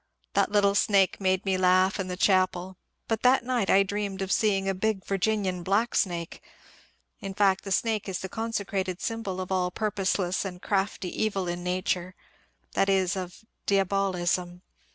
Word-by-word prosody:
The - - +3
little 205 -1 +3
snake 200 -1 +2
made 190 0 +1
me 190 -1 +1
laugh 185 +2 +3
in 190 - -2
the 180 0 -4
chapel, 185 -1 +2 0.3
but 225 -1 -1
that 250 -1 +4
night 245 -5 0
I 195 - +6
dreamed 195 -1 -3
of 190 - -4
seeing 195 -3 +2
a 195 - +1
big 195 0 -1
Virginian 195 -2 0
black 205 +6 +1
snake. 170 -3 -1 0.8
In 195 -1 -6
fact, 195 -2 +3
the 195 - -5
snake 215 0 0
is 185 - -2
the 190 - -5
consecrated 200 -4 -3
symbol 225 -5 -3
of 185 0 -5
all 180 -1 +1
purposeless 190 -2 -1
and 180 -2 -6
crafty 195 -1 -2
evil 195 -4 -1
in 175 0 -3
nature, 180 0 -2 0.3
— - - -41
that 195 - +2
is, 190 0 +2
of 185 +3 -7 0.2
diabolism. 185 -2 0
190 Hz, 170 wpm, -27 LUFS, 185-200 Hz, 0.8 s, I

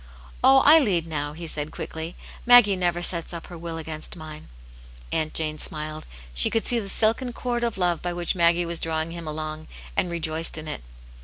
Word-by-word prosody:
"Oh, 265 +1 +7
I 315 +3 +9
lead 185 - +2
now," 145 -2 -3
he 165 +2 -7
said, 150 -2 -3
quickly, 160 +2 -6 0.3
''Maggie 245 -5 +8
never 175 -1 0
sets 170 -1 -3
up 165 - -7
her - - -6
will 165 -1 -5
against 155 0 -6
mine." 155 -2 -9 0.6
Aunt 155 -1 -1
Jane 155 -1 -1
smiled. 155 0 -3 0.3
She - - +4
could 225 - 0
see 240 - +2
the 200 -3 -6
silken 230 +4 0
cord 240 -1 -2
of 235 -4 -1
love 175 -3 +1
by 175 - -2
which 175 0 -1
Maggie 170 -1 +3
was 170 0 +1
drawing 160 0 -2
him 170 -1 -7
along, 155 0 -5 0.3
and 180 - +1
rejoiced 165 -1 -2
in 155 0 -6
it. 150 - -4
170 Hz, 200 wpm, -25 LUFS, 155-190 Hz, 0.6 s, I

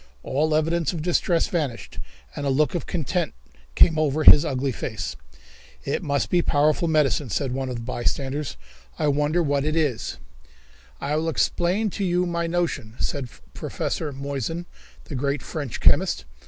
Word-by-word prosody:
All 155 +3 +1
evidences 165 +1 +1
of 155 - -4
distress 175 0 +2
vanished, 145 -9 -3 0.4
and 145 - -4
a 140 - 0
look 145 +3 +2
of 175 - -3
content 160 - -1 0.4
came 160 -2 +5
over 155 0 +1
his 150 - +9
ugly 135 -3 -1
face. 115 - -4 0.7
"It - - -1
must 140 -1 -1
be 180 - +4
a - - +1
powerful 150 +3 +2
medicine," 145 -5 +2
said 130 +6 -1
one 130 0 -2
of 125 - -3
the 115 - -5
bystanders. 135 - -2 0.4
"I 150 - +1
wonder 150 +4 +2
what 140 -2 +1
it 155 +1 0
is." 140 -9 0 0.8
"I 145 +2 -1
will 160 +1 0
explain 180 +6 +1
to 200 - -3
you 180 -1 +2
my 170 -1 -1
notion," 165 -10 -2
said 135 -4 -2 0.2
Professor 155 -2 -3
Moissan, 140 +4 -4 0.4
the - - -10
great 140 +1 -1
French 145 -8 -5
chemist. 65 - +3
150 Hz, 165 wpm, -24 LUFS, 135-165 Hz, 0.8 s, his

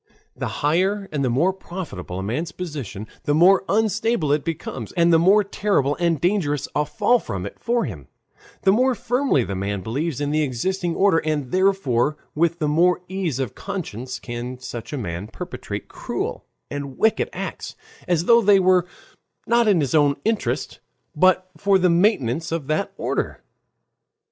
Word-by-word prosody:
The - - -3 0.2
higher 190 +6 +1
and 145 -2 -1
the 130 - +1
more 160 +11 +2
profitable 170 - -7
a 95 - -3
man's 130 - -2
position, 140 - -6 0.2
the 145 - +2
more 185 +4 +6
unstable 220 -5 +1
it 150 0 +2
becomes, 145 - -5
and 170 0 +3
the 165 - +6
more 195 +5 +5
terrible 195 -8 0
and 170 -3 +1
dangerous 165 -4 0
a 150 0 +1
fall 245 0 +2
from 95 - -5
it 100 - -8
for 235 0 0
him, 80 - -8 0.6
the 190 - +5
more 250 +5 +3
firmly 245 - +1
the 100 - -4
man 100 +1 -2
believes 140 - -2
in 145 0 -1
the 155 +1 +2
existing 170 +7 -1
order, 195 -4 +4
and 150 -5 -2
therefore 170 -8 +2 0.2
with 170 +2 +1
the 155 -3 -1
more 175 +4 +3
ease 185 -8 -2
of 130 -5 -3
conscience 130 - -5
can 120 +1 -6
such 120 -2 -7
a 145 - -3
man 95 -4 -4
perpetrate - - -7
cruel - - -4 0.3
and 140 -2 -5
wicked 220 0 +2
acts, - - -6 0.3
as 170 -1 +1
though 235 +2 +6
they 205 -2 +5
were 185 -1 +3 0.6
not 235 -1 +3
in 190 -6 +4
his 135 -4 -1
own 145 -2 +4
interest, 220 -1 -1 0.4
but 185 +3 +3
for 200 -1 +3
the 180 -1 +3
maintenance 170 - +1
of 165 -4 -2
that 155 +7 -1
order. - - -2
165 Hz, 170 wpm, -22 LUFS, 135-190 Hz, 0.6 s, more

